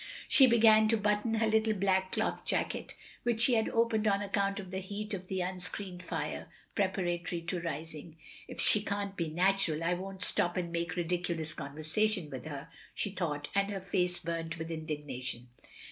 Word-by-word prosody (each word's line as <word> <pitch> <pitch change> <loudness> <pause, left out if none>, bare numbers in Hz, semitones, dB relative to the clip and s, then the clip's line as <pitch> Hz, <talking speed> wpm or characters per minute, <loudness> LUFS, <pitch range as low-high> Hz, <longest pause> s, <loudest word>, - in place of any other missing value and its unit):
She 270 -3 +8
began 220 -2 +7
to 225 +1 +3
button 210 +2 +1
her 225 0 +2
little 220 0 +3
black 190 -1 +2
cloth - - 0
jacket, - - -2
— - - -22
^which 235 -2 +1
she 245 +2 +5
had 220 -1 +3
opened 230 -2 +2
on 200 0 +2
account 200 0 0
of 190 -2 -8
the 190 - -2
heat 205 +3 -5
of 185 -2 -4
the 190 -1 -1
unscreened 180 0 -4
fire, - - -4
— - - -32
preparatory 175 -3 0
to 170 +1 -2
rising. 160 0 -6 0.3
"If - - -9
she 210 - +4
can't 200 -1 -2
be 170 -3 -1
natural, 175 -1 +2
I 170 +2 +2
won't 190 +2 -5
stop 175 -2 +1
and 175 -2 -1
make 170 0 -2
ridiculous 170 -2 -1
conversation 155 +4 -1
with 130 0 -6
her," 150 0 -6 0.3
she 205 - -1
thought, 150 -6 -2
and 200 0 +2
her 200 -1 -2
face 180 -1 0
burnt 165 -1 -3
with 165 0 -5
indignation. 145 -6 -4
185 Hz, 185 wpm, -32 LUFS, 165-205 Hz, 0.3 s, She